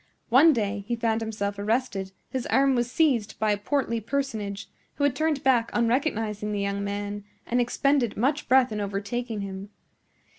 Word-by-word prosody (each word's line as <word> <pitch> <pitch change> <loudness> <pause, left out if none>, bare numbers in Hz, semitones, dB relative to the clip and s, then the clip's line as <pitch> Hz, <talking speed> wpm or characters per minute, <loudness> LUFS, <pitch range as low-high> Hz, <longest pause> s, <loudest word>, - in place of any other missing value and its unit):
One 275 +7 +7
day 210 -5 -1
he 240 - 0
found 230 -1 0
himself 205 -2 -3
arrested; 205 -3 -1 0.2
his 260 -2 -3
arm 270 0 +3
was 240 -1 0
seized 255 -10 +1
by 215 -1 +1
a 205 - +1
portly 235 +2 -1
personage, 220 -5 -3 0.3
who 285 - -2
had 285 -3 +2
turned 310 -1 0
back 245 -3 +3
on 235 -1 +3
recognizing 225 -5 -1
the 205 - -1
young 200 0 -1
man 205 0 -4 0.2
and 245 +1 +1
expended 250 0 +1
much 275 +6 0
breath 260 -1 +5
in 210 -1 -2
overtaking 205 +3 -3
him. 195 0 -6
230 Hz, 175 wpm, -26 LUFS, 205-260 Hz, 0.3 s, One